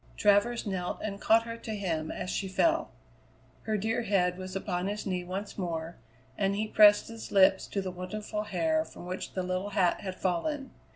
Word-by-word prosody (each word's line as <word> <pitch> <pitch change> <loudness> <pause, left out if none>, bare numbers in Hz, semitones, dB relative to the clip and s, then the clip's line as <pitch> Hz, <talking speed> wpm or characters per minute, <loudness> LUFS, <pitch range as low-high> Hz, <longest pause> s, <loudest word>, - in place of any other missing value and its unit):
Travers 210 +4 +3
knelt 185 -3 -2
and 200 -1 -4
caught 225 +1 +5
her 230 0 -6
to 220 -1 -5
him 165 -6 -2
as 180 - -4
she 195 - -2
fell. 190 - +2 0.8
Her 215 0 0
dear 225 +4 0
head 190 -5 +2
was 185 0 -7
upon 185 -1 -2
his 205 +1 -3
knee 185 -3 -1
once 195 +4 -5
more, 165 -2 -3 0.4
and 195 -1 +1
he 215 +2 -1
pressed 210 -1 +6
his 230 -1 -8
lips 190 -1 +5
to 195 - -2
the 185 - -3
wonderful 210 +4 -4
hair 315 +7 +1
from 245 - -11
which 185 +1 -5
the 185 - -2
little 185 +2 -2
hat 180 -3 +3
had 190 -2 -5
fallen. 265 - -2
195 Hz, 190 wpm, -30 LUFS, 185-215 Hz, 0.8 s, pressed